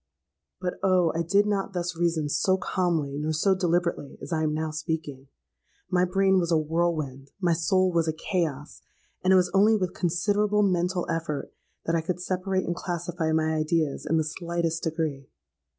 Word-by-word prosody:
"But, 180 -1 -3
oh! 185 -3 +3
I 165 - 0
did 200 +5 +3
not 200 -2 -1
thus 175 -1 -2
reason 165 -3 0
so 185 +6 +2
calmly 165 -7 -1
nor 155 +1 -1
so 190 +6 +3
deliberately 175 -5 -1
as - - -6
I 160 - +1
am 155 -1 +1
now 155 +1 -2
speaking. 155 -3 -4 0.6
My 180 0 +3
brain 190 +1 +3
was 170 -1 -1
a 165 - +5
whirlwind—my 155 0 -1
soul 185 +3 +2
was 165 -2 +1
a 160 - +1
chaos; 155 -4 -3 0.4
and 185 - +3
it - - +7
was 180 -1 +3
only 210 +3 +5
with 185 -3 -1
considerable 205 +4 +1
mental 180 -1 +1
effort, 165 -3 -3 0.3
that 165 - 0
I 165 - +2
could 180 +2 -3
separate 185 +1 -1
and 175 - -2
classify 175 -2 -3
my 160 0 +1
ideas 155 -1 0
in 160 - +3
the 160 - +2
slightest 170 +1 -2
degree. 155 -4 -3
170 Hz, 175 wpm, -26 LUFS, 160-185 Hz, 0.6 s, it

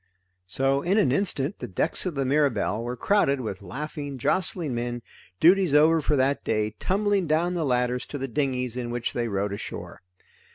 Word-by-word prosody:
So 135 +8 +1
in 185 +6 +1
an 200 -12 +3
instant 150 0 -1
the - - -5
decks 155 - 0
of 175 - -3
the 135 -1 0
Mirabelle 130 -6 +1
were 120 +1 -4
crowded 140 - +2
with 110 -5 -5
laughing 145 - -6
jostling 165 +1 0
men, 120 0 -3 0.4
duties 180 -2 +5
over 160 +2 +5
for 150 +1 +1
that 135 +1 +1
day, 110 -1 0
tumbling 200 -1 +1
down 165 +4 +1
the 170 -2 -1
ladders 125 -1 0
to 145 - -5
the 135 0 -3
dinghies 125 -2 -1
in 125 -1 -4
which 120 0 -3
they 120 -1 -1
rowed 100 -1 -1
ashore. 100 - -7
135 Hz, 180 wpm, -26 LUFS, 120-160 Hz, 0.4 s, duties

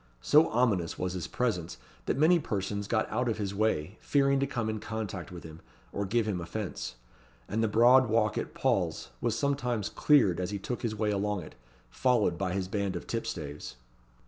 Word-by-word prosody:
So 155 +2 +5
ominous 110 -8 +1
was 90 0 -2
his 90 -2 -4
presence, 90 - -2 0.3
that - - 0
many 165 +4 +5
persons 100 - -3
got 110 -1 +1
out 120 +2 0
of 110 - -1
his 100 -2 -3
way, 100 -3 -1
fearing 140 -1 +2
to 140 - +1
come 120 -5 -2
in 110 0 -2
contact 105 -6 -5
with 90 -2 -9
him, 80 0 -11 0.3
or 100 0 -2
give 115 +2 +1
him 95 -5 -1
offence; 95 - -5 0.5
and 110 +2 -1
the - - +3
broad 120 +3 +5
walk 110 -2 +2
at - - -4
Paul's - - 0
was 115 -1 0
sometimes 125 -7 0
cleared 120 - +4
as 90 -1 -2
he 105 - -3
took 120 +5 -4
his 115 -3 -2
way 105 0 0
along 100 -1 -1
it, - - -11 0.4
followed 120 -9 +2
by 90 0 -2
his 95 -1 -2
band 100 -1 -2
of 85 - -5
tipstaves. 75 - -5
105 Hz, 195 wpm, -29 LUFS, 95-120 Hz, 0.5 s, So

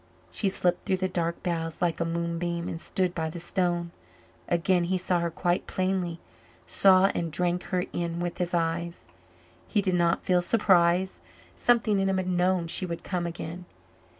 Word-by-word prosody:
She 200 - +1
slipped 180 -2 0
through 190 -2 +2
the 185 0 0
dark 170 -2 -2
boughs 165 -2 -2
like 175 -2 0
a 170 - 0
moonbeam 170 +1 -2
and 165 - -5
stood 185 0 -1
by 160 -2 -2
the 170 - -7
stone. 175 -1 -1 0.6
Again 175 +1 +2
he 185 +2 0
saw 180 -1 +1
her 170 0 0
quite 175 +2 -1
plainly 185 -3 -1 0.5
saw 190 0 +5
and 170 -1 -2
drank 175 +3 0
her 180 -1 0
in 170 -1 -2
with 175 -1 -3
his 175 0 -1
eyes. 170 +1 -2 0.6
He 210 - +1
did 190 -2 +1
not 170 -1 +2
feel 180 -1 +3
surprise 185 -2 +3 0.3
something 225 -4 +2
in 195 0 +1
him 190 - +1
had 185 - -1
known 180 -1 +2
she 175 +2 0
would 170 -1 -5
come 175 -2 -2
again. 170 +1 -6
175 Hz, 180 wpm, -27 LUFS, 170-185 Hz, 0.6 s, saw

